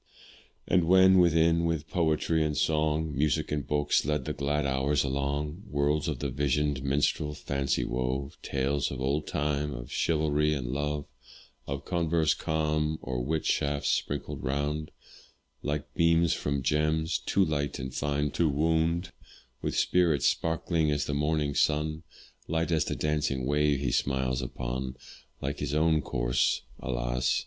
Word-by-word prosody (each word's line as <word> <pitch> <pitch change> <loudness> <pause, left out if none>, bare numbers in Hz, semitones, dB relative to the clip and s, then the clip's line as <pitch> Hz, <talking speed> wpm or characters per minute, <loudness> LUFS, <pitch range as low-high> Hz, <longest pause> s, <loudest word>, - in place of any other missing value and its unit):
And 90 -2 +3
when 95 +1 +6
within, 85 -1 +4
with 80 -2 -1
poetry 80 -1 +1
and 75 -2 -1
song, 75 0 +1
Music 75 0 0
and 75 -2 -2
books 75 -1 +2
led 75 -3 -1
the - - -2
glad 75 +1 -1
hours 70 +2 +1
along; 70 +4 -2
Worlds 70 +1 +1
of 75 -4 -1
the 70 0 -3
visioned 70 +1 0
minstrel, 75 +2 0
fancy 70 -1 -1
wove, 65 +3 -2
Tales 70 +1 -1
of 65 - -6
old 70 +3 -1
time, 75 -1 -1
of - - -8
chivalry 75 -1 +1
and 65 -3 -3
love; 75 +1 -2 0.6
Or 70 0 -3
converse 85 0 +1
calm, 75 0 -1
or 65 -1 -2
wit 80 +4 -1
shafts 70 -1 0
sprinkled 70 -1 -2
round, 75 +3 -2 0.7
Like 75 -1 -3
beams 85 0 +3
from 70 -2 -2
gems, 75 +4 +1
too 100 - +2
light 70 -2 -2
and 65 0 -5
fine 75 +2 -1
to 80 +4 +1
wound; 80 +4 +1 0.5
With - - -2
spirits 85 -5 +2
sparkling 80 -1 +1
as 75 -1 0
the 70 - -3
morning's 75 -1 0
sun, 75 +1 +1 0.5
Light 80 +1 -1
as 80 -2 +2
the - - -2
dancing 75 -4 -1
wave 75 0 +2
he 65 -3 -1
smiles 65 -1 0
upon, 65 +1 -4 0.5
Like 70 +2 -3
his 75 0 -2
own 80 0 +3
course - - 0 0.2
alas! - - 0
75 Hz, 150 wpm, -28 LUFS, 70-80 Hz, 0.7 s, when